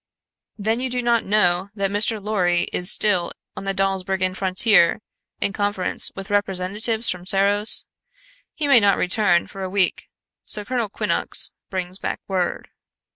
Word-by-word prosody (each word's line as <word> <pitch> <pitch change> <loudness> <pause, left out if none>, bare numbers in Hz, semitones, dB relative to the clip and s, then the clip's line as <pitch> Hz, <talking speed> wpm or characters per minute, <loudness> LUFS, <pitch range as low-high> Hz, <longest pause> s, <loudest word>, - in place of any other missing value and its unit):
"Then 220 +3 -1
you 260 +1 -3
do 250 0 -3
not 235 -1 +1
know 190 -2 +1
that 200 -2 -2
Mr. 210 +2 +1
Lorry 180 -4 0
is 180 +2 +3
still 190 -5 +2 0.2
on - - -8
the 195 - -1
Dawsbergen 190 -1 -1
frontier 190 0 +2 0.4
in 200 - -1
conference 205 -2 0
with 195 +1 -8
representatives 205 +3 0
from 180 -1 -7
Serros. 200 +3 +4 0.7
He 300 - -3
may 275 -4 +6
not 200 -2 +3
return 180 -2 +1
for 195 - -10
a 190 - -4
week, 190 -1 0 0.3
so 210 -1 -4
Colonel 240 -2 -2
Quinnox - - 0 0.2
brings 185 0 -4
back - - -4
word." 185 -2 -3
195 Hz, 150 wpm, -21 LUFS, 185-215 Hz, 0.7 s, may